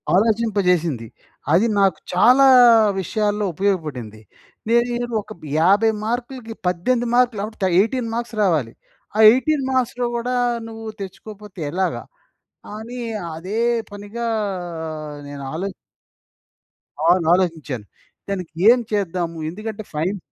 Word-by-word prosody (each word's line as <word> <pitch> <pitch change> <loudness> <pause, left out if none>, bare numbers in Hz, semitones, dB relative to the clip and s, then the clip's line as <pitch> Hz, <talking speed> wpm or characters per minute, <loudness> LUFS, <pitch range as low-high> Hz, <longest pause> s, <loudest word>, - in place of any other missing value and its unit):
ఆలోచింపజేసింది. 185 - +1 0.5
అది 195 +8 +4
నాకు 195 -1 +3
చాలా 250 +9 +6 0.6
విషయాల్లో 210 +2 -1
ఉపయోగపడింది. 150 - -2 0.5
నేరు 240 +1 +1
ఒక 205 - -16
బ్ - - -20 0.2
50 200 +7 +4
మార్కులకి, 240 0 -4
18 235 +8 0
మార్కులు 245 -4 +2
అవుట్. 215 -2 -8 0.2
18 230 +3 0
మార్క్స్ 235 0 -4
రావాలి. 155 - +1 0.4
ఆ - - -1
18 270 +3 +1
మార్క్స్‌లో 250 -1 0
గూడా, 245 +2 -2 0.3
నువ్వు 225 0 -9 0.2
తెచ్చుకోకపోతే 205 0 -10
ఎలాగా, 185 +2 -1 0.7
అని 235 +3 -7 0.4
అదే 185 +7 -4 0.3
పనిగా 205 +3 -6 1.0
నేను 145 -1 -8
ఆలో 180 +5 -3 1.4
అవును. 175 +1 +4
ఆలోచించాను. 160 - -1 0.4
దానికి 180 -5 -4 0.2
ఏం 245 +1 +6
చేద్దాము, 175 -5 -2
ఎందుకంటే 215 +4 -6
ఫైన్ 170 +7 -1
205 Hz, 105 wpm, -21 LUFS, 175-235 Hz, 1.4 s, చాలా